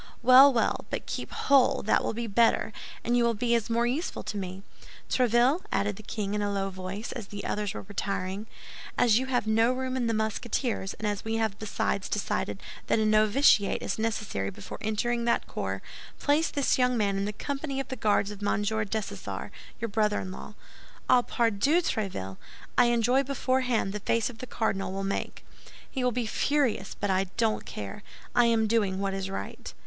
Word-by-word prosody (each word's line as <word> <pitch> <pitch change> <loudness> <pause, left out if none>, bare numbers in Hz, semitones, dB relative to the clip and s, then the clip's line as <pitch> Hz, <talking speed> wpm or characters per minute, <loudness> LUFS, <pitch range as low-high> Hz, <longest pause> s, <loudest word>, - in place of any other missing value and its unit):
"Well, 260 +3 +9
well, 235 -3 0
but - - -3
keep - - -4
whole; 275 -2 +3
that 215 - +2
will - - -2
be 235 +1 -2
better, 225 0 +2 0.3
and 240 - +1
you 240 - +4
will 235 -1 +2
be 235 +1 +2
more 235 +1 +2
useful 275 +9 -2
to - - -5
me. 190 -1 -5 0.4
Tréville," 250 - +3
added 200 +1 0
the 215 - -10
king, 210 -1 -4
in 210 - 0
a 205 0 0
low 195 -1 -1
voice, 185 +4 -6
as 230 -6 -6
the 205 0 -7
others 210 -1 -2
were - - -5
retiring, 195 0 -3 0.5
"as 230 -2 +5
you 260 - -3
have 245 -4 0
no 225 +2 +3
room 260 0 -2
in 245 -2 0
the 230 - +1
Musketeers, 220 -1 -1
and 215 - -3
as 205 -1 -2
we 220 0 -2
have 220 -3 -1
besides 205 -2 -2
decided 210 - -2 0.2
that - - +3
a 220 - +2
novitiate 215 +1 +4
is - - -2
necessary 210 - -2
before 100 +1 -9
entering 235 +2 0
that 235 - +1
corps, - - -4 0.3
place 295 +3 +2
this 280 -2 +1
young 250 -1 +3
man 200 -3 +1
in 195 0 -1
the 210 - -2
company 275 +5 -4
of 270 - -4
the 260 - -3
Guards 210 -3 +1
of 205 -1 -9
Monsieur 210 +1 0
Dessessart, 215 0 -4 0.3
your 230 - -2
brother 210 0 +1
in 185 - -5
law. 210 - -9 0.5
Ah, 250 - +6
pardieu, 235 +6 +2
Tréville! 185 - -3 0.4
I 245 - +6
enjoy 240 +2 +3
beforehand 255 -6 0
the 210 - -3
face 230 +3 +1
the 255 +3 -8
cardinal 195 -5 -1
will 195 +1 -3
make. 195 0 -3 0.5
He 260 - -2
will 250 - +3
be 240 0 -1
furious; 250 -4 0
but 205 -1 0
I 190 +1 +2
don't 225 -2 0
care. 105 - -6 0.3
I 240 - +5
am 230 -1 +3
doing 210 -4 +1
what 195 -1 -1
is 195 0 -3
right." 195 - -6
220 Hz, 195 wpm, -28 LUFS, 200-245 Hz, 0.5 s, Well